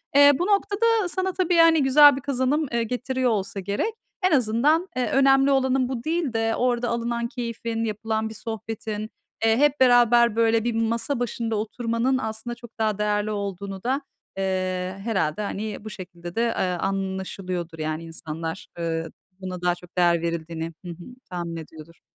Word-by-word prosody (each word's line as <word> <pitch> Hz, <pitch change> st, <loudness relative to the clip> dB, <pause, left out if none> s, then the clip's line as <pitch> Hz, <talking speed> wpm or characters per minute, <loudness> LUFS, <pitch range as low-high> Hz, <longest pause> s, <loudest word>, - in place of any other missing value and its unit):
Eee, 285 Hz, 0 st, +9 dB
bu 355 Hz, -, +1 dB
noktada 410 Hz, +1 st, +2 dB
sana 375 Hz, +1 st, -1 dB
tabii, 360 Hz, -1 st, +1 dB
hani, 330 Hz, -2 st, +6 dB
güzel 290 Hz, +1 st, +7 dB
bir 270 Hz, -, -5 dB
kazanım, 280 Hz, +3 st, 0 dB
eee, 235 Hz, -1 st, +1 dB
getiriyor 250 Hz, +2 st, -1 dB
olsa 200 Hz, -2 st, -2 dB
gerek. 200 Hz, -, -2 dB, 0.3 s
En 370 Hz, -1 st, +3 dB
azından, 280 Hz, -, +3 dB
eee, 255 Hz, -1 st, 0 dB
önemli 270 Hz, 0 st, +5 dB
olanın 265 Hz, -1 st, +2 dB
bu 245 Hz, -3 st, -4 dB
değil 320 Hz, -5 st, -1 dB
de 225 Hz, 0 st, +1 dB
orada 245 Hz, -1 st, +1 dB
alınan 235 Hz, 0 st, -1 dB
keyfin, 230 Hz, -1 st, -4 dB
yapılan 220 Hz, 0 st, -2 dB
bir 220 Hz, -, -8 dB
sohbetin, 220 Hz, -1 st, -5 dB, 0.4 s
eee, 225 Hz, 0 st, +4 dB
hep 295 Hz, +1 st, +3 dB
beraber, 240 Hz, -2 st, +5 dB
böyle, 230 Hz, -1 st, +3 dB
bir 240 Hz, 0 st, 0 dB
masa 230 Hz, +4 st, -1 dB
başında 230 Hz, -1 st, -2 dB
oturmanın 230 Hz, +4 st, 0 dB
aslında 220 Hz, 0 st, -4 dB
çok 235 Hz, -1 st, -15 dB
daha 215 Hz, -2 st, +1 dB
değerli 210 Hz, 0 st, 0 dB
olduğunu 200 Hz, -1 st, -5 dB
da, 265 Hz, +4 st, 0 dB, 0.4 s
eee, 185 Hz, -1 st, -1 dB
herhâlde 200 Hz, -5 st, 0 dB
hani 210 Hz, +1 st, -4 dB
bu -, -, -5 dB
şekilde 175 Hz, -3 st, -9 dB
de, 230 Hz, -, +1 dB
eee, 235 Hz, -1 st, 0 dB
anlaşılıyordur, 185 Hz, -2 st, -3 dB
yani, 155 Hz, +1 st, -3 dB
insanlar. 165 Hz, +2 st, -6 dB
Eee, 165 Hz, -1 st, -2 dB, 0.3 s
buna 185 Hz, -1 st, -5 dB
daha 180 Hz, 0 st, +2 dB
çok 175 Hz, +1 st, -17 dB
değer 175 Hz, -2 st, +4 dB
verildiğini 165 Hz, 0 st, -3 dB
Hı 175 Hz, -, -5 dB
hı, -, -, -7 dB, 0.3 s
tahmin 175 Hz, -2 st, -4 dB
ediyordur. 160 Hz, 0 st, -11 dB
225 Hz, 165 wpm, -24 LUFS, 190-255 Hz, 0.4 s, Eee